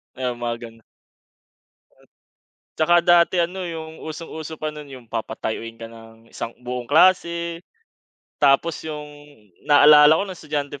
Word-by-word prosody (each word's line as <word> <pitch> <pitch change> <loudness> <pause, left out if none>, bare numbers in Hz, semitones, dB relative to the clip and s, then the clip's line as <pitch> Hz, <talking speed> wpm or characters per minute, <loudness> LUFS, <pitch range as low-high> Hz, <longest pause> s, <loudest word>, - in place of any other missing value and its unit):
Ay, 130 -1 -2
mga 120 -1 -3
ganun. 115 0 -21 2.0
At - - 0
saka 175 - +7
dati 175 +1 +4
ano, 175 +2 -1
yung 160 -2 -7
usong-uso 160 0 -8
pa 155 0 -4
nun 150 -2 -10
yung 130 -3 -12
papatayuin 115 0 -5
ka 115 - -8
ng 115 0 -16
isang - - -5
buong 125 0 -6
klase 170 0 +2 0.8
tapos 145 +3 +2
yung 150 -1 -6 0.6
naalala 150 +1 +7
ko 195 - -1
ng 195 - -7
estudyante 145 -4 -5
150 Hz, 135 wpm, -22 LUFS, 125-170 Hz, 2.0 s, saka